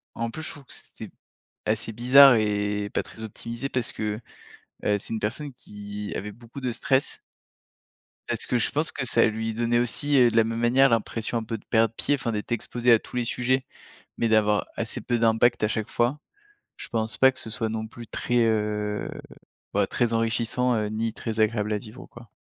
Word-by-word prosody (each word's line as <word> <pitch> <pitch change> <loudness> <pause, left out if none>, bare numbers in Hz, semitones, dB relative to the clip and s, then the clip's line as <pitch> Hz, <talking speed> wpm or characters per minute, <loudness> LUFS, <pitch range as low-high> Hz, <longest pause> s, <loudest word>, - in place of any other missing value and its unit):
en 115 - -2
en 115 - -4
plus 160 - -7
je 160 - -4
trouve 145 -4 -11
que - - -11
c'était - - -9 0.5
assez 110 +1 -1
bizarre 125 +4 +8
et 105 -1 0
pas - - 0
très 110 - -11
optimisé 115 +4 -5
parce 125 -2 -1
que, 105 0 -3 0.7
heu, 105 - +3
c'est 115 - -6
une 110 - -1
personne 130 +7 -3
qui 105 -3 -7
avait 105 +1 -4
beaucoup 120 +5 -11
de 125 -2 -1
stress. 130 +3 +1 1.1
Parce - - -1
que 125 - +1
je 120 - +1
pense 155 +2 +1
que 130 - -4
ça - - +4
lui 110 0 -1
donnait 120 +1 +1
aussi, 140 +4 +1
heu, 120 -3 +6
de 115 - -1
la 115 - +7
même 115 +1 -3
manière, 130 +3 +5
l'impression 115 0 -1
un 115 - -2
peu 115 +1 -4
de - - -20
perdre 115 -1 +2
pied. 145 - +1
Enfin 125 -4 -3
d'être 105 +2 -4
exposé 120 +1 +1
à 115 - +8
tous - - -12
les 125 - +1
sujets, 130 +2 0 0.5
mais 115 - +1
d'avoir 105 -1 +3
assez - - -3
peu 120 -1 -1
d'impact 115 +1 +3
à - - +4
chaque 110 0 -2
fois, 120 +5 0 0.6
je - - -9
pense 110 -1 -2
pas 130 0 +6
que 130 - -10
ce 110 - -4
soit 110 0 -2
non 110 0 -3
plus 115 +1 -11
très, 120 0 -1
heu, 105 -1 -1 0.6
bah, - - +2
très 120 -1 0
enrichissant, 115 +2 +1
heu, 105 -1 0
ni 110 +1 -2
très 110 -1 -5
agréable 110 -1 +1
à 105 - 0
vivre 110 +4 -11
quoi. 120 -1 -14
115 Hz, 210 wpm, -25 LUFS, 110-120 Hz, 1.1 s, bizarre